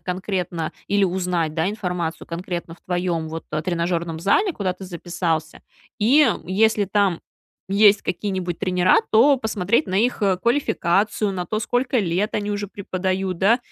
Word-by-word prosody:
конкретно, 180 -2 -3 0.2
или 200 0 +1
узнать, 180 -4 -1
да, 160 +2 +1
информацию 180 -6 -3
конкретно 170 -1 -5
в - - -25
твоем, 175 -3 -2
вот, 160 +1 -6
э, 155 0 -1
тренажерном 170 -1 -2
зале, 350 - +2
куда 195 - -2
ты 190 - -11
записался. 170 -3 -3 0.4
И 265 +8 +5 0.2
если 210 +2 +2
там 195 -3 +1 0.5
есть 200 +1 +5
какие-нибудь 185 -2 -3
тренера, 185 -1 +3 0.2
то 265 +6 +6
посмотреть 220 +1 0
на 185 - -3
их, 225 +3 +1
э, 195 -2 +3
квалификацию, 210 -3 +1
на 180 -2 -4
то, 215 - -2
сколько 245 +2 0
лет 195 +1 0
они 210 0 -1
уже 205 0 -3
преподают, 190 -2 -3
да? 210 +6 +4
185 Hz, 155 wpm, -22 LUFS, 175-210 Hz, 0.5 s, то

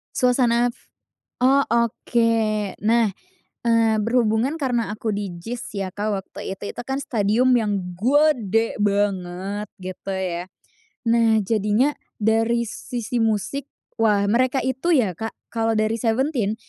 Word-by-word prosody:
Suasana 245 -1 +3 0.7
oh 270 +3 +4
oke. 235 0 +1 0.5
Nah 230 +2 +4 0.6
eee, 230 -1 +3
berhubungan 235 +5 +1
karena 245 -7 0
aku 215 0 -2
di 200 -1 -3
JIS 225 +8 -7
ya 195 -1 -2
Kak, 210 +1 -2
waktu 190 - -8
itu, 200 +1 -7
itu - - -6
kan 265 +2 -3
stadium 240 0 +2
yang 200 -6 0
gede 230 - +2
banget 200 0 -1
gitu 185 +1 -7
ya, 180 -2 -3 0.6
nah 230 -1 +4
jadinya 215 +6 +2 0.3
dari 225 +2 +2
sisi 240 +1 -4
musik, 225 +6 -1 0.3
wah 210 -3 +3
mereka 255 +3 +2
itu 265 +7 +1
ya 220 - +2
Kak, 225 0 -4 0.2
kalau 225 -1 0
dari 215 +1 +1
17, 235 -2 0
225 Hz, 125 wpm, -23 LUFS, 205-245 Hz, 0.7 s, oh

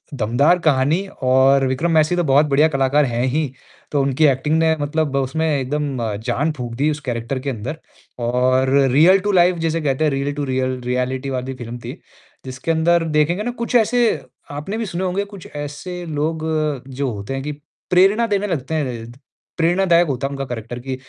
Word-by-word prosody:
दमदार 130 +9 +2
कहानी 150 +6 +2 0.2
और 135 +1 +4
विक्रम 135 +7 0
मेसी 155 +1 +3
तो 175 - +1
बहुत 140 +1 +4
बढ़िया 145 +3 +4
कलाकार 135 +2 +3
हैं 120 -1 -1
ही। 145 +1 -1 0.4
तो 145 - +2
उनकी 135 +3 +2
एक्टिंग 145 +3 +2
ने 160 0 +3
मतलब 145 -1 -1
उसमें 135 +4 -1
एकदम 145 -1 -1 0.3
जान 150 +4 0
फूँक 120 -2 -5
दी 145 +5 +1
उस 150 - -4
कैरेक्टर 120 +2 -2
के 140 +2 -4
अंदर 130 +6 -5 0.5
और 130 +2 +2 0.2
रियल 175 +8 +6
टू - - +2
लाइफ़ 180 -1 +4
जैसे 165 0 0
कहते 140 0 0
हैं 155 - +2
रियल 140 +1 -1
टू 145 - -3
रियल 130 -1 -1
रियलिटी 125 +2 -2
वाली 130 0 -3
फिल्म 120 -1 -7
थी, - - -7 0.5
जिसके 130 +5 -3
अंदर 165 +1 +3
देखेंगे 170 +7 +2
ना 245 - -2
कुछ 240 - -3
ऐसे 240 +1 +4 0.5
आपने 150 +10 -5
भी 230 - -2
सुने 180 0 -4
होंगे 190 +3 -1
कुछ 180 - -11
ऐसे 160 +5 -6
लोग 155 +1 -2 0.4
जो 135 0 -2
होते 100 +4 -6
हैं 135 0 -4
कि 150 - -3 0.4
प्रेरणा 195 +6 +4
देने 205 -1 0
लगते 160 -5 -3
हैं। 120 -6 -3 0.5
प्रेरणादायक 175 0 +3
होता 135 -1 -2
है - - -8
उनका 135 -1 -4
करैक्टर 120 -1 -6
कि, 130 +1 -4
145 Hz, 190 wpm, -20 LUFS, 130-165 Hz, 0.5 s, रियल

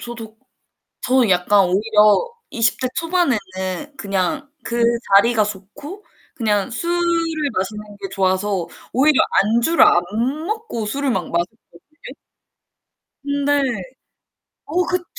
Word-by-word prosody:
저도 225 -2 -8 0.7
저는 255 -3 +2
약간 190 +2 +4
오히려 210 - +3 0.2
20 230 -3 +1
대 255 - 0
초반에는 335 -7 +1 0.6
그냥 200 - -2
그 235 0 -1 0.3
자리가 225 +2 +5
좋고 250 - -8 0.3
그냥 210 -3 0
술을 345 +8 -1 0.5
마시는 210 +2 -4
게 195 - -5
좋아서 190 -1 0 0.3
오히려 275 +3 +4 0.2
안주를 235 +10 +3
안 175 - +5 0.4
먹고 430 - -4
술을 275 +5 -2
막 185 -6 -2
마셨거든요. 175 +2 -4 1.5
근데 285 0 +1 1.0
어 360 +1 0
그쵸. 360 0 -2
225 Hz, 215 characters per minute, -20 LUFS, 200-285 Hz, 1.5 s, 자리가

